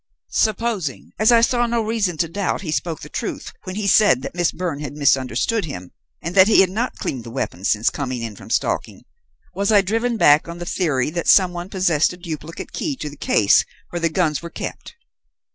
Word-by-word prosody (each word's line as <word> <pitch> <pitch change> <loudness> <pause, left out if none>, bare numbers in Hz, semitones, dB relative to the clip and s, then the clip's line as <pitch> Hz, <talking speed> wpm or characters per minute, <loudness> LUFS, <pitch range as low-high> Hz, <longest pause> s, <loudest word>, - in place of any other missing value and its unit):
Supposing, 215 - -1
as 215 +2 +5
I 230 -1 +6
saw 240 0 +2
no 235 -1 0
reason 215 -6 -1
to 165 - +1
doubt, 200 +4 -2
he 170 -6 -4
spoke 160 0 -2
the - - -8
truth - - -5
when 185 - -6
he 210 0 -3
said 200 - +4
that - - -5
Miss 175 -1 +1
Byrne 175 -6 -4
had 145 -2 -6
misunderstood 140 - +1
him 90 - -8 0.3
and 170 - -4
that 190 0 +7
he 220 - +6
had 185 -1 +2
not 235 +6 -2
cleaned 125 -3 -4
the 115 - -9
weapon 115 -6 -4
since 110 +2 +2
coming 130 -4 -4
in 110 -3 -5
from - - -13
stalking, - - -1 0.5
was 200 +3 0
I 205 -2 +6
driven 225 +4 -1
back 150 -5 +5
on 170 0 -7
the 175 - -6
theory 150 -7 0
that 170 0 -3
some 185 -3 +5
one 175 +1 -6
possessed 175 -5 +2
a - - -11
duplicate 165 -2 -7
key 295 - -3
to 150 - -6
the - - -11
case 105 -7 +3 0.3
where 175 - -3
the 165 0 +1
guns 160 -3 0
were 170 - -7
kept? - - -7
175 Hz, 215 wpm, -21 LUFS, 145-205 Hz, 0.5 s, that